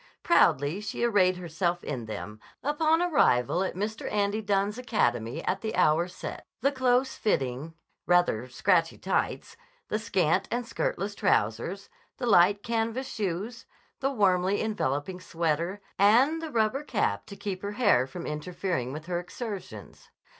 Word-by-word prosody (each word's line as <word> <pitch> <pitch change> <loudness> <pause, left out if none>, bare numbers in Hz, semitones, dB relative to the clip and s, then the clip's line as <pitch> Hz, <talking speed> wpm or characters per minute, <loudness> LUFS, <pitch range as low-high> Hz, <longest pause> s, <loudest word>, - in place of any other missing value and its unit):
Proudly 145 +8 +3
she 210 - -4
arrayed 190 -6 +3
herself 175 0 -2
in 125 -6 -4
them, 105 0 -6 0.2
upon 315 +3 +2
arrival 180 - +3
at 190 - -3
Mr. 215 +4 -3
Andy 205 +1 0
Dunne's 205 +2 0
academy 120 - 0
at 190 - -1
the 220 0 -3
hour 160 +3 +3
set; 180 - -7 0.2
the 275 +3 +3
close 260 -1 +2
fitting, 140 - -1 0.3
rather 175 -10 +2
scratchy 165 +5 +2
tights, 190 - -2 0.3
the 215 - 0
scant 190 -7 +1
and 240 0 -2
skirtless 210 -3 -2
trousers, 120 - 0 0.3
the - - -3
light 200 -2 +5
canvas 230 +3 -1
shoes, 210 +4 -4 0.3
the 270 - +1
warmly 195 -5 +2
enveloping 180 -5 -2
sweater, 170 +3 -1 0.2
and 250 +11 +5
the 325 - -5
rubber 230 +4 +1
cap 100 - -1
to 200 - -9
keep 195 -2 -5
her 205 +1 -4
hair 205 - +3
from 170 +6 -7
interfering 150 -3 -3
with 155 +2 -7
her 175 0 -2
exertions. 200 +3 -8
195 Hz, 145 wpm, -28 LUFS, 165-225 Hz, 0.3 s, light